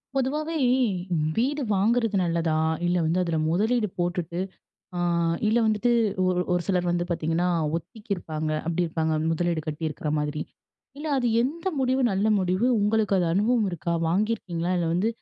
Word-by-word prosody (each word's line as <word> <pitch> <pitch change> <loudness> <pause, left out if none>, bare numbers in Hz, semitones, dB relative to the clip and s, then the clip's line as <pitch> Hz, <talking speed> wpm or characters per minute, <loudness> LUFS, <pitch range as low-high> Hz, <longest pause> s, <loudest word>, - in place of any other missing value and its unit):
பொதுவாவே, 300 +5 -1 0.8
வீடு 275 +5 +1
வாங்குறது 220 +2 +2
நல்லதா? 170 -2 0 0.3
இல்ல 175 +1 +1
வந்து 165 +3 +1
அதுல 165 -2 -1
மொதலீடு 215 +6 +1
போட்டுட்டு, 175 -1 -2 0.6
அ - - -2 0.5
இல்ல 220 +2 +3
வந்துட்டு 220 +2 +2 0.4
ஒரு 180 -1 +1
ஒரு 175 0 +1
சிலர் 180 -2 +1
வந்து 175 0 0
பார்த்தீங்கன்னா, 165 +1 0 0.3
ஒத்திக்கி 205 +6 -10
இருப்பாங்க. 155 -3 -4 0.2
அப்டி 170 +1 +1
இருப்பாங்க 160 -1 -1
முதலீடு 170 -1 -1
கட்டியிருக்ற 155 0 -3
மாதிரி. 150 0 -2 0.6
இல்ல 305 - -6
அது 245 -2 +1
எந்த 320 +8 -4
முடிவு 260 0 +1
நல்ல 195 +2 +1
முடிவு? 185 +5 +1
உங்களுக்கு 210 -1 +2
அது 175 - +1
அனுபவம் 215 +2 +2
இருக்கா? 170 0 -2
வாங்கியிருக்கீங்களா? 180 -2 -1
இல்ல 170 -1 0
வந்து 185 +6 +1
180 Hz, 145 wpm, -25 LUFS, 170-225 Hz, 0.8 s, இல்ல